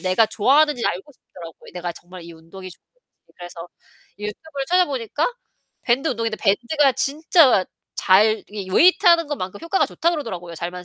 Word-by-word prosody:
내가 185 +4 +2
좋아하는지 270 +4 +2
알고 190 +12 -4
싶더라고요, 170 -9 -14
내가 175 -1 -5
정말 180 +1 -13
이 170 - -11
운동이 165 +4 -12
좋은지. - - -16 0.6
그래서 175 -1 -10 0.5
유튜브를 270 +7 -6
찾아보니까 290 - 0 0.6
밴드 255 +6 0
운동인데 230 -4 -2
밴드가 245 +7 +1
진짜 280 - +3 0.3
잘 215 +4 +3
이 200 -3 -7
웨이트하는 340 - +4
것만큼 195 -9 -5
효과가 335 +3 0
좋다고 340 +1 -1
그러더라고요, 180 - -7
잘만 175 +2 -6
220 Hz, 400 characters per minute, -21 LUFS, 185-290 Hz, 0.6 s, 웨이트하는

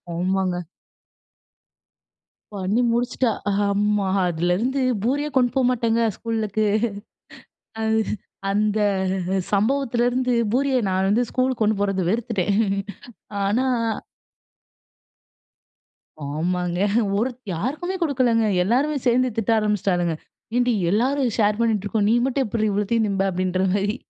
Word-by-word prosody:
ஆமாங்க. 180 0 -1 1.9
பண்ணி 200 +5 0
முடிச்சிட்டா 245 0 0 0.2
ஆஹமா, 205 0 +1 0.2
அதுலருந்து 180 +11 0 0.2
பூரியே 290 +5 0
கொண்டு 245 -1 +4
போமாட்டேங்க, 235 -3 +2 0.2
ஸ்கூலுக்கு. 215 -2 -1 1.8
அந்த 210 +1 +1 0.7
சம்பவத்திலிருந்து 245 +2 +1 0.2
பூரிய 270 +1 +1
நான் 190 +1 +1
வந்து 235 +4 +3
ஸ்கூலுக்கு 255 -2 -1
கொண்டு 210 -1 +1
போறதே 195 -2 0
வெறுத்துட்டேன். 210 -3 0 0.9
ஆனா, 225 +7 +1 2.6
ஆமாங்க. 175 +4 -2 0.4
ஒரு 240 +5 +1 0.2
யாருக்குமே 300 - -3
கொடுக்கலங்க, 250 -7 +2 0.2
எல்லாருமே 270 +9 +1
சேர்ந்து 250 +1 +3
திட்ட 225 0 0
ஆரம்பிச்சிட்டாளுங்க, 190 -5 0 0.4
"ஏன்டி, 245 -1 +2 0.2
எல்லாரும் 255 +4 +1
ஷேர் 210 0 +2
பண்ணிட்டு 220 -4 +1
இருக்கோம், 205 0 0
நீ - - +4
மட்டும் 270 0 0
எப்படி 215 0 -1
இவ்வளோத்தையும் 210 +3 +1
திம்ப," 195 -1 -1
அப்படின்ற 185 +1 -1
மாரி. 205 +3 0
220 Hz, 95 wpm, -23 LUFS, 195-245 Hz, 2.6 s, கொண்டு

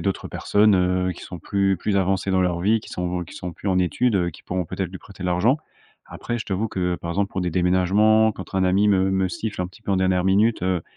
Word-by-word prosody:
a - - -6
d'autres 95 -1 -2
personnes, 105 0 +3
heu, 90 0 +1
qui - - -12
sont 90 - -8
plus 95 +2 0
plus 100 +1 -1
avancées 95 0 0
dans 95 -1 +2
leur 90 -1 0
vie, 110 +5 +3
qui - - -13
sont 90 0 -3
qui - - -14
sont, 90 -1 -6
plus 100 - -5
en 95 -1 +2
études, 100 +6 +1
heu, 90 -2 +1
qui - - -15
pourront 90 -1 -3
peut-être 90 +1 -4
lui 95 - -8
prêter 100 -2 -12
l'argent. 90 - +2 0.5
Après, 120 - -5
je 110 - -5
t'avoue 105 +3 -1
que, 90 -2 -1
par 85 - -8
exemple, 100 +3 -1
pour 95 - -3
des 90 - -1
déménagements, 95 +5 +3
quand 95 -3 -9
r - - -4
un 95 - +2
ami 95 +3 +3
me 95 -1 +3
me 95 -1 +1
siffle 105 +2 -4
un - - -2
petit 95 - -18
peu 100 - -1
en - - +2
dernière 95 -1 +1
minute, 105 +3 +2
heu, 90 -2 0
95 Hz, 270 wpm, -23 LUFS, 90-100 Hz, 0.5 s, personnes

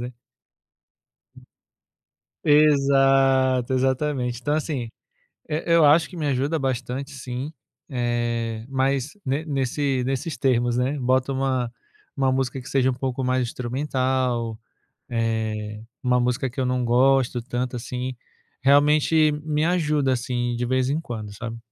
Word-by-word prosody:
né. 125 +1 -5 2.3
Exato, 135 -3 +4
exatamente. 130 -2 0
Então 145 +3 0
assim, 145 -6 -2 0.6
e 155 +1 -2
eu 170 -2 +5
acho 155 +3 +5
que 180 - -11
me 155 -3 -2
ajuda 140 +4 0
bastante 130 0 -3
sim, 130 +2 -5 0.4
eh, 120 -3 -2
mas 135 +1 0 0.2
ne 140 +4 -1
nesse 135 -2 -1
nesses 135 +4 -2
termos, 120 -3 +1
né. 130 +4 0
Bota 130 +2 +1
uma 130 -3 -1 0.4
uma 135 -1 +2
música 130 0 -1
que 125 - -10
seja 130 -1 +2
um - - -2
pouco 130 0 -3
mais 130 0 +1
instrumental, 125 -2 -1 0.5
eh, 110 -2 -2 0.2
uma 125 -1 +2
música 125 +1 0
que 130 - -5
eu 130 - +1
não 125 -1 0
gosto 125 0 +3
tanto 125 +1 -3
assim, 125 +1 -4 0.5
realmente 150 +3 +4
me 155 0 0
ajuda, 150 -6 +1
assim, 120 -1 -1
de 125 - -2
vez 130 +1 +1
em 155 - 0
quando, 110 -8 -7
sabe. 115 +2 -6
130 Hz, 135 wpm, -24 LUFS, 120-140 Hz, 2.3 s, eu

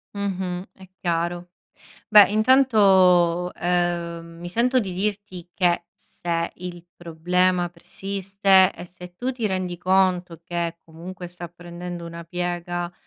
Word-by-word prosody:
Mh-mh, 190 -2 -3
è 190 - -15
chiaro. 175 0 -2 0.6
Beh, 210 -2 +8
intanto, 195 -7 +4
uhm, 170 -1 -1
mi 175 - -6
sento 245 +7 +2
di 195 -6 -2
dirti 195 -2 -4
che 175 -2 +1
se 170 -1 -4
il 175 -1 -8
problema 175 +2 0
persiste, 195 +2 +2
e - - -9
se 180 0 -13
tu 255 +5 -2
ti 240 -4 -2
rendi 185 -3 -3
conto 180 -2 +1
che 170 -1 -3
comunque 175 +3 -9
sta 175 0 -9
prendendo 175 0 -8
una 170 0 -8
piega, 175 0 -3
180 Hz, 125 wpm, -23 LUFS, 175-190 Hz, 0.6 s, Beh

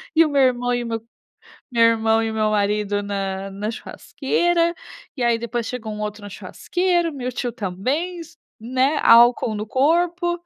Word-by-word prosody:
e 330 +1 +6
o - - -1
meu 280 -2 +2
irmão 245 -1 +1
e 245 - -1
o 235 - -6
meu 225 -1 -3 0.7
meu 235 -1 +3
irmão 225 0 +3
e 225 - -1
o - - -5
meu 215 -1 +1
marido 205 0 0
na 195 -1 -4
na 205 +3 -4
churrasqueira, 340 +8 -1 0.4
e 255 - -3
aí 235 -1 +2
depois 235 0 -3
chegou 225 -3 -5
um 210 - -6
outro 210 0 -5
na 205 - -8
churrasqueira, 350 - -1
o - - -11
meu 255 -2 -4
tio 245 0 -3
também, 260 - -3 0.4
né, 260 +5 +1
álcool 235 -1 +5
no 210 +1 -4
corpo 345 - +1
235 Hz, 185 wpm, -21 LUFS, 215-285 Hz, 0.7 s, e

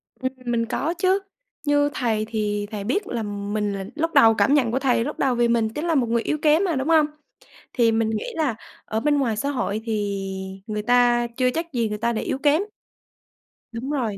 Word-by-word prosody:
Ừm, 260 0 -3
mình 235 -1 0
có 295 +7 -1
chứ. 370 +3 +2 0.5
Như 290 0 +3
thầy 220 -3 0
thì 205 -2 -1
thầy 205 -2 -4
biết 360 - -1
là 230 -2 -3
mình 205 0 -2
là 195 -1 -4
lúc 330 +2 -1
đầu 225 0 +7
cảm 275 - +3
nhận 250 -6 +3
của 260 - 0
thầy 250 -4 +2
lúc 295 - -5
đầu 260 -3 +2
vì 240 0 +3
mình 230 -2 +2
chính 300 +9 -4
là 330 -2 +1
một 245 -4 +2
người 235 0 +2
yếu 305 - -1
kém 310 +4 +4
mà, 345 -5 0
đúng 265 +3 -2
hông? 315 -2 +5 0.7
Thì 230 -3 +3
mình 225 0 +1
nghĩ 215 -1 -2
là 295 -9 0 0.3
ở 220 - -2
bên 290 +3 +2
ngoài 235 -6 0
xã 280 +5 -1
hội 220 -6 -2
thì 205 -3 -2 0.4
người 210 -1 -2
ta 240 0 +3
chưa 255 -1 +3
chắc 330 0 -4
gì 230 -3 0
người 210 - -3
ta 235 +2 0
đã 220 - -2
yếu - - -2
kém. 295 +5 +3 1.1
Đúng 255 +5 -4
rồi, 230 -8 -1
240 Hz, 225 wpm, -23 LUFS, 220-290 Hz, 1.1 s, đầu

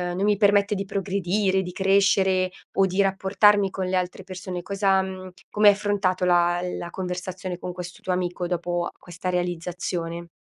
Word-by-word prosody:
non 190 - -1
mi 210 0 +3
permette 205 0 +3
di 195 0 -2
progredire, 195 0 0
di 180 -1 -6
crescere 190 -1 +3 0.2
o 195 0 +3
di 190 +2 -3
rapportarmi 195 +1 +3
con 190 0 -3
le 185 0 0
altre 180 +1 -3
persone." 185 -1 -6
Cosa 195 -1 +2
mhmm, 185 0 -7 0.2
come 210 0 +4
hai 205 - +9
affrontato 200 -3 0
la 175 0 +3 0.2
la 170 - -5
conversazione 180 0 -5
con 180 - -5
questo 180 0 -8
tuo 185 - -1
amico 180 -1 -2
dopo 175 0 -2
questa 175 +1 -6
realizzazione? 175 -1 -3
185 Hz, 165 wpm, -24 LUFS, 180-195 Hz, 0.2 s, hai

